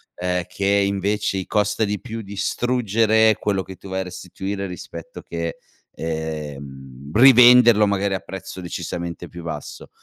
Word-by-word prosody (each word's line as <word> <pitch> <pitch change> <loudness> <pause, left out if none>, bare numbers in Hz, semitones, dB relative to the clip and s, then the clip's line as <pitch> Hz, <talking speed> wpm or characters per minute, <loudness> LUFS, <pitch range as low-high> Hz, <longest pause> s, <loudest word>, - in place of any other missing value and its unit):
ehm, 90 0 -1
che 100 - -4
invece 100 0 +1
i 95 - -3
costa 105 +1 +1
di 105 0 -3
più 115 -2 -6
distruggere 110 +1 +2
quello 100 -2 0
che 95 0 -11
tu - - -12
vai 95 0 -2
a - - -2
restituire 95 +2 -5
rispetto 85 -2 -9
che, 85 -1 -5 0.4
ehm, 70 -4 -6
rivenderlo 120 -3 +7
magari 100 0 0
a - - -2
prezzo 95 +1 -8
decisamente 85 0 -5
più 85 -1 -10
basso, 80 -3 -7
95 Hz, 145 wpm, -22 LUFS, 85-105 Hz, 0.4 s, rivenderlo